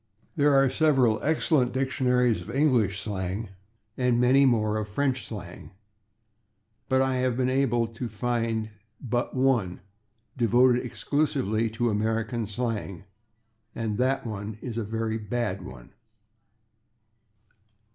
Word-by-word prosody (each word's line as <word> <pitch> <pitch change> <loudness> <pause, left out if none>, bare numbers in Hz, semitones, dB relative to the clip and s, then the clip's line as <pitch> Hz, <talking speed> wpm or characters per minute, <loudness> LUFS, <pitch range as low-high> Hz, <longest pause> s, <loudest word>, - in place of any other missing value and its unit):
There 145 -1 +3
are 135 0 +5
several 130 -5 +3
excellent 150 -4 +1
dictionaries 125 -5 +1
of 85 - -10
English 120 -9 +2
slang, 95 +1 -4 0.5
and 125 -2 +1
many 135 +3 +5
more 110 -3 +1
of 105 -1 -3
French 130 +3 -1
slang, 95 -4 -9 1.2
but 130 0 +3
I 130 -1 0
have 125 -1 0
been 130 0 +1
able 125 -3 +2
to 115 +1 -6
find 115 0 -2 0.3
but 120 +1 -2
one 125 -9 +1 0.6
devoted 125 +1 +3
exclusively 125 -5 -1
to 115 +1 -1
American 110 +1 -1
slang, 105 -5 -4 0.7
and 110 -2 -3
that 130 +1 +1
one 105 -1 -5
is 115 -1 -5
a - - -2
very 110 +1 -2
bad 105 -2 -2
one. 65 -6 -11
120 Hz, 120 wpm, -26 LUFS, 110-130 Hz, 1.2 s, are